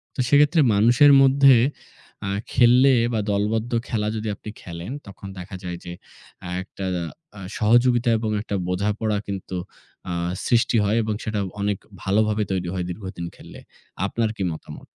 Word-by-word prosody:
তো - - -9
সেক্ষেত্রে 145 +4 +5
মানুষের 120 +8 +6
মধ্যে 135 0 +6 0.7
অ্যা 100 - -2 0.2
খেললে 125 +2 +5 0.2
বা 110 - +1
দলবদ্ধ 110 +4 -1 0.2
খেলা 105 -2 -1
যদি 110 0 -4
আপনি 105 - -10
খেলেন, 85 +5 -7 0.2
তখন 100 0 -10
দেখা 95 +2 -8
যায় 90 -1 -5
যে 85 - -6 0.5
অ্যা 90 - -7
একটা 95 0 -8 0.5
আ - - -9 0.2
সহযোগিতা 120 +2 +3
এবং 110 -1 -2
একটা 105 - -4
বোঝাপড়া 105 +3 -1
কিন্তু 95 -1 -5 0.6
আ - - -1 0.3
সৃষ্টি 120 -1 +3
হয়, 105 +3 +1
এবং 110 0 -1
সেটা 110 -1 -2 0.2
অনেক 100 -1 0 0.3
ভালোভাবে 105 +2 +1
তৈরি 90 -2 -2
হয় 90 -2 -2
দীর্ঘদিন 90 -2 -6
খেললে। - - -13 0.5
আপনার 115 +2 -1
কি 100 - -2
মতামত? 80 - -10
105 Hz, 150 wpm, -23 LUFS, 95-120 Hz, 0.7 s, মানুষের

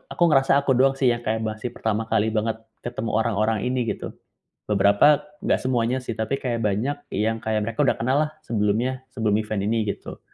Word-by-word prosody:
aku 175 - +2
ngerasa 135 -1 +4
aku 140 - +1
doang 135 +1 +4
sih 130 -3 +3
yang 120 - -1
kayak 110 0 -1
masih 110 +2 -4
pertama 110 0 -1
kali 110 0 +1
banget 110 +1 -2 0.2
ketemu 120 -2 -3
orang-orang 110 -1 +1
ini, 125 -1 0
gitu. - - -4 0.6
Beberapa, 100 +9 +5 0.2
nggak - - +2
semuanya 125 -1 0
sih, 120 - -4
tapi 110 +5 -1
kayak 120 -3 -2
banyak 110 +8 0 0.2
yang 110 +2 0
kayak 110 -1 0
mereka 115 +4 -2
udah - - +4
kenal 130 +4 +1
lah - - -18
sebelumnya, 115 +4 0
sebelum 110 -4 +1
event 105 -2 -3
ini 115 +2 +1 0.2
gitu. - - -10
115 Hz, 190 wpm, -24 LUFS, 110-125 Hz, 0.6 s, Beberapa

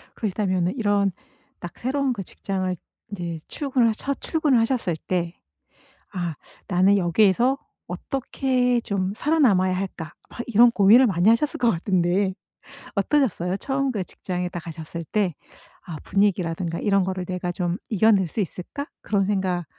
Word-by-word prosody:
그러시다면은 185 -3 0
이런 205 -3 +2 0.5
딱 175 - -8
새로운 265 +1 0
그 200 -4 -5
직장을 185 0 -3 0.4
이제 170 -4 -4
출근을 255 -6 +1
첫 275 +5 -4
출근을 300 -7 +2
하셨을 225 -8 0
때 175 -2 -1 0.8
'아 175 -4 -3 0.3
나는 195 +1 +4
여기에서 210 +8 +3 0.3
어떻게 255 -2 0
좀 195 -2 -2
살아남아야 220 - +3
할까?' 180 -3 -5 0.2
막 - - -13
이런 240 +1 +6
고민을 225 +5 +6
많이 185 +2 +3
하셨을 230 +6 +2
것 240 -1 +3
같은데 185 +2 +1 0.6
어떠셨어요? 200 - +1
처음 270 +1 -1
그 205 -5 -2
직장에 180 0 -4
딱 175 - -5
가셨을 165 +1 -7
때 190 -6 0 0.5
아 170 -4 -6
분위기라든가 180 -4 0
이런 195 -2 +2
거를 185 -1 -3
'내가 180 -1 -3
좀 175 -1 -2
이겨낼 210 -2 +4
수 215 - -5
있을까?' 205 - -4
그런 200 -2 +1
생각 190 -4 -1
195 Hz, 310 characters per minute, -24 LUFS, 180-235 Hz, 0.8 s, 이런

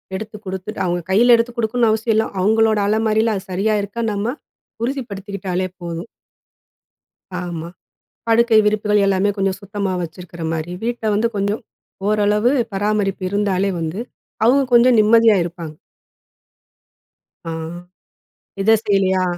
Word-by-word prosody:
எடுத்து 210 +1 -6
குடுத்துட்டு 190 +2 -5
அவங்க 175 0 0
கையில 240 +5 +6
எடுத்து 230 +1 -1
குடுக்கணும்னு 230 0 +1
அவசியம் 220 0 0
இல்லை. 220 - +2
அவங்களோட 220 +2 +3
அலமாரியில 220 +1 +2
அது 190 - -4
சரியா 205 +4 +1
இருக்கான்னு 220 +2 -3
நம்ம 215 +5 -2 0.5
உறுதிப்படுத்திக்கிட்டாலே 200 -7 -3
போதும். 170 +3 -6 1.3
ஆமா. 170 -2 -5 0.6
படுக்கை 230 0 +4
விரிப்புகள் 210 -1 +2
எல்லாமே 195 +1 +2
கொஞ்சம் 195 -1 0
சுத்தமா 200 -1 -3
வச்சிருக்கிற 170 0 -8
மாரி, 165 +2 -3
வீட்ட 240 -1 -3
வந்து 225 +3 +2
கொஞ்சம் 205 +4 -1 0.5
ஓரளவு 210 +3 +2 0.2
பராமரிப்பு 200 -1 -1
இருந்தாலே 200 -1 0
வந்து, 165 +5 -3 0.5
அவங்க 270 +3 +5
கொஞ்சம் 240 0 +6
நிம்மதியா 225 0 +5
இருப்பாங்க. 170 -3 -7 1.7
ஆ, 165 - -2 1.1
இத 215 +3 +3
செய்யலையா? 190 -2 +2
205 Hz, 120 wpm, -19 LUFS, 190-225 Hz, 1.7 s, கையில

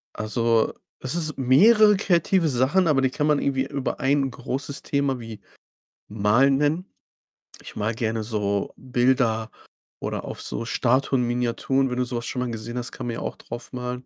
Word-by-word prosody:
Also, 115 +1 +1 0.3
es 130 +5 -1
ist 155 -4 0
mehrere 210 - +6
kreative 180 -2 +2
Sachen, 140 +8 +2
aber 140 -3 +3
die 130 - +2
kann 150 +3 -1
man 150 -2 +3
irgendwie 135 -1 0
über 140 -2 -3
1 135 0 +2
großes 135 +3 -4
Thema 140 -2 -1
wie 115 -3 -9 0.7
Malen 110 +7 +3
nennen. 155 +6 0 0.8
Ich - - -11
male 110 +2 -1
gerne 110 -1 -2
so 100 -2 -2
Bilder, 125 -3 +1 0.5
oder - - -4
auf - - -7
so 115 - -3
Statuen, 130 +1 +1
Miniaturen, 125 +2 0
wenn 125 - -3
du 125 - +1
so 120 -1 -3
was 120 - -4
schon 125 - -3
mal 125 - -2
gesehen 115 +2 -6
hast, 120 - -3
kann 125 - -6
man 120 - -2
ja - - -5
auch - - -5
drauf 120 0 -8
malen. 125 0 -5
125 Hz, 180 wpm, -24 LUFS, 115-140 Hz, 0.8 s, mehrere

